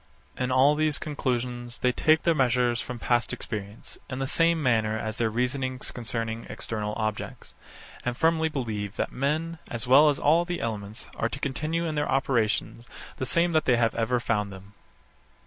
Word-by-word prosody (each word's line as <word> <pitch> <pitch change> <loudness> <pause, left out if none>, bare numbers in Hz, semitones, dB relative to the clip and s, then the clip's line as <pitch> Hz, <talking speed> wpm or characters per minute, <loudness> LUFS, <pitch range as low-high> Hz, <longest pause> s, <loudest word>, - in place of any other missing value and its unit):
In 125 0 -1
all 130 +3 +5
these 155 -1 +1
conclusions 125 -4 -3
they 125 - +2
take 155 +4 +3
their 170 - +4
measures 125 -3 +2
from 125 - -6
past 120 +1 +1
experience, 105 -1 -6
in 130 - -4
the 135 - -1
same 165 +3 +2
manner 110 -4 +2
as 110 0 -4
in - - +2
their - - +2
reasonings 130 +3 -1
concerning 115 -1 -4
external 105 -1 -3
objects; 110 -1 -4 0.5
and 125 0 -2
firmly 160 0 +2
believe 110 -8 -3
that - - -2
men, 155 +5 -1
as 120 +1 -3
well 140 +5 +7
as 145 - +1
all 165 +2 +4
the 175 0 -3
elements, 105 -2 -4
are 115 - 0
to 130 - -5
continue, 155 +5 -2
in 160 - -2
their 145 -1 -1
operations, 120 -2 0 0.3
the 130 - -3
same 170 +4 +2
that 155 -1 +2
they 125 -2 +4
have 115 -1 +2
ever 120 +2 +1
found 105 -4 -1
them. 95 +1 -12
125 Hz, 180 wpm, -27 LUFS, 115-150 Hz, 0.5 s, well